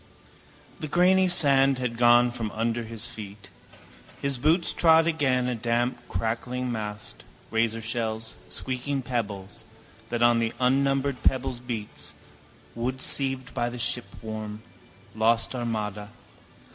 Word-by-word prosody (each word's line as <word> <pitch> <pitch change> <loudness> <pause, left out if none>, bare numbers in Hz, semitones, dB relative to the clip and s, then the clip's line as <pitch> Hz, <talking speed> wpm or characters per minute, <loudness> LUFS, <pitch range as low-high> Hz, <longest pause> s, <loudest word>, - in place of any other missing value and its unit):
The 155 - -4
grainy 185 +4 +4
sand 140 -6 +5
had 125 -2 -2
gone 120 0 +5
from 115 -3 -3
under 115 +1 -1
his 115 0 -4
feet. 105 -4 -8 0.7
His 140 -2 -2
boots 160 +6 +2
trod 160 -1 +5
again 135 -6 +1
a 125 - 0
damp 120 +2 -1
crackling 120 +6 -2
mast, 105 -2 -5 0.3
razorshells, 110 0 -1 0.2
squeaking 130 +1 -3
pebbles, 110 -3 -3 0.5
that 120 0 0
on 120 -1 +5
the 115 -1 -1
unnumbered 135 +1 +1
pebbles 130 -2 0
beats, 115 -4 -6 0.6
wood 125 +3 -3
sieved 130 -2 0
by 120 0 -1
the 120 - -7
shipworm, 110 -3 -1 0.5
lost 115 +2 +2
Armada. 105 -4 -3
120 Hz, 120 wpm, -26 LUFS, 110-130 Hz, 0.7 s, sand